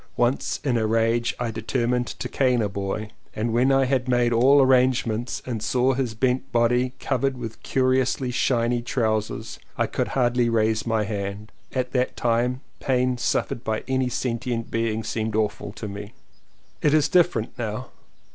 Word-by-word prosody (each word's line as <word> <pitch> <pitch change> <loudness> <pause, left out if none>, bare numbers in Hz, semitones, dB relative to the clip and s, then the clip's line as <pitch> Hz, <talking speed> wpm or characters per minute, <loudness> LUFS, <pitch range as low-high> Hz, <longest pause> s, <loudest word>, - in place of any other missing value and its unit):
Once 120 +3 +1
in 130 -5 +1
a 110 - +1
rage 115 +1 +1
I 120 -2 -1
determined 120 +2 -1
to - - -5
cane 125 -4 +2
a - - +1
boy. 100 +2 -4 0.2
When 120 +4 +2
I 135 0 +4
had 130 -1 0
made 120 -1 +2
all 130 +5 +5
arrangements 125 -3 +2
and 115 -4 -3
saw 125 +4 +2
his 125 -4 -2
bent 130 +3 0
body 125 +2 +2
covered 135 0 0
with 115 -2 -7
curiously 130 0 +1
shiny 120 -1 +1
trousers 110 -3 -2 0.2
I - - +2
could - - -2
hardly 120 -1 +2
raise 110 0 +1
my 110 -1 +1
hand. 100 0 -4 0.2
At 130 -1 -2
that 125 -1 0
time 120 +2 +1 0.2
pain 125 -2 +1
suffered 120 - -1
by 110 0 -2
any 130 -1 +1
sentient 120 -1 -2
being 115 -1 -1
seemed 110 0 -2
awful 105 -2 -1
to 110 - -6
me. 100 +2 -8 0.7
It 150 0 +3
is 155 - +4
different 160 -11 +2
now. 115 +3 -4
120 Hz, 160 wpm, -24 LUFS, 110-130 Hz, 0.7 s, all